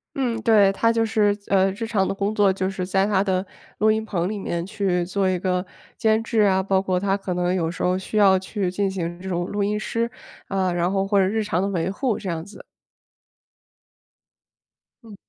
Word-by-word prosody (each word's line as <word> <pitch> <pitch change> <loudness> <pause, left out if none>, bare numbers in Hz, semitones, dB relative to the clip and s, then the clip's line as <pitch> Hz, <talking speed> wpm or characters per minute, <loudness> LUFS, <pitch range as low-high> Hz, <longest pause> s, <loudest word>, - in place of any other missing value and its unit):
嗯， 240 -4 -1
对， 210 -3 +5
他 230 +3 +2
就 230 -1 +1
是， 210 -2 +2
呃， 195 -1 +3
日 205 +4 -5
常 205 -4 0
的 - - -1
工 200 +2 -2
作 205 -2 +4
就 185 0 -2
是 190 -1 -3
在 190 +1 +1
他 200 -2 +2
的 190 -1 0 0.3
录 215 +1 +4
音 220 0 0
棚 180 -5 -2
里 210 +1 -4
面 170 -3 -3
去 190 -4 -1
做 190 +1 0
一 185 - 0
个 180 0 -1 0.3
监 220 0 +2
制 225 -1 +1
啊， 190 -2 +3
包 190 0 +2
括 185 -2 0
他 195 0 +1
可 195 -2 -4
能 180 0 0
有 170 -3 0
时 170 - -5
候 180 0 +2
需 190 +3 -4
要 195 -2 +6
去 190 -1 -3
进 195 +1 0
行 175 -2 -4
这 190 - -6
种 175 -1 -1
录 205 +2 -2
音 210 +1 0
师， 230 +2 -2 0.4
啊， 190 -2 0
然 175 +1 0
后 195 0 0
或 200 0 +3
者 190 - +3
日 220 +2 0
常 180 -3 -1
的 195 - 0
维 180 -3 -1
护 235 +2 -1
这 200 - -7
样 165 -2 -3
子。 200 - -13 2.4
嗯。 220 -3 -12
195 Hz, 235 characters per minute, -23 LUFS, 185-210 Hz, 2.4 s, 要